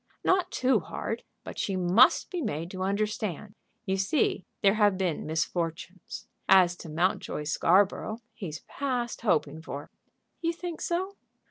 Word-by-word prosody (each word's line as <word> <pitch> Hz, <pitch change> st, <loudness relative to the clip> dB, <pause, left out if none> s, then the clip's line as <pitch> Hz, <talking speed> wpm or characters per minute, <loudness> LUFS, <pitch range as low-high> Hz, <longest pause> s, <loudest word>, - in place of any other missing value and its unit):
"Not 370 Hz, -1 st, +3 dB
too 260 Hz, -4 st, +2 dB
hard, -, -, -4 dB, 0.2 s
but -, -, -7 dB
she 195 Hz, -, -1 dB
must 185 Hz, +7 st, +5 dB
be 360 Hz, -2 st, -2 dB
made 170 Hz, -, -3 dB
to 185 Hz, -, -6 dB
understand. 210 Hz, 0 st, -2 dB, 0.3 s
You 190 Hz, -1 st, 0 dB
see 195 Hz, 0 st, +1 dB, 0.2 s
there 195 Hz, -1 st, +6 dB
have 205 Hz, -3 st, +3 dB
been 180 Hz, -6 st, -1 dB
misfortunes. 175 Hz, +6 st, -3 dB, 0.2 s
As 185 Hz, -2 st, +6 dB
to 165 Hz, -, -9 dB
Mountjoy 165 Hz, -1 st, 0 dB
Scarborough, 190 Hz, +7 st, +2 dB, 0.2 s
he's 170 Hz, -9 st, -6 dB
past 250 Hz, -4 st, -3 dB
hoping 160 Hz, -7 st, +1 dB
for." 145 Hz, -2 st, -7 dB, 0.5 s
"You 335 Hz, 0 st, +1 dB
think 345 Hz, -1 st, -6 dB
so?" 375 Hz, +3 st, -2 dB
195 Hz, 140 wpm, -28 LUFS, 175-240 Hz, 0.5 s, there